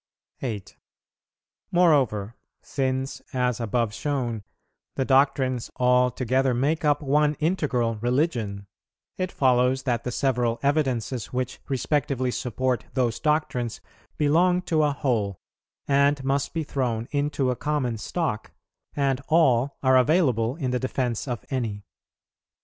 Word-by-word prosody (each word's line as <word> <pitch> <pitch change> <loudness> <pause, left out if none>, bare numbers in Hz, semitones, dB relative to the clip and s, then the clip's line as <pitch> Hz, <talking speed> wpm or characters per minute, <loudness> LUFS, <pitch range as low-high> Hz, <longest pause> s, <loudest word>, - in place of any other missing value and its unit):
8. 110 -7 -5 0.9
Moreover, 135 - +2 0.3
since, 130 0 -2
as 125 -2 0
above 115 -1 0
shown, 120 -3 -2 0.5
the 135 - 0
doctrines 130 -2 +2
all 125 0 +3
together 130 +1 0
make 145 +7 0
up 150 0 +2
one 150 +2 +2
integral 140 - 0
religion, 120 -5 -1 0.5
it 185 -1 -2
follows 130 0 +2
that 120 -2 -1
the 125 - -3
several 120 -2 0
evidences 130 -5 0
which 125 0 -3
respectively 135 -1 0
support 125 +1 -1
those 120 -4 0
doctrines 150 -6 0 0.4
belong 175 +5 +3
to 160 -3 +1
a 150 -1 +3
whole, 115 -9 -1 0.5
and 140 0 +3
must 135 +1 0
be 165 -1 -2
thrown 125 -5 -2
into 145 -2 0
a - - -1
common 130 -3 -1
stock, 145 - -3 0.4
and 140 -2 +1
all 140 -5 +3
are 130 -1 +5
available 130 -5 +2
in 135 -6 -2
the 125 - 0
defence 130 -2 -2
of 120 -3 -4
any. 110 -6 -2
130 Hz, 125 wpm, -25 LUFS, 120-145 Hz, 0.9 s, are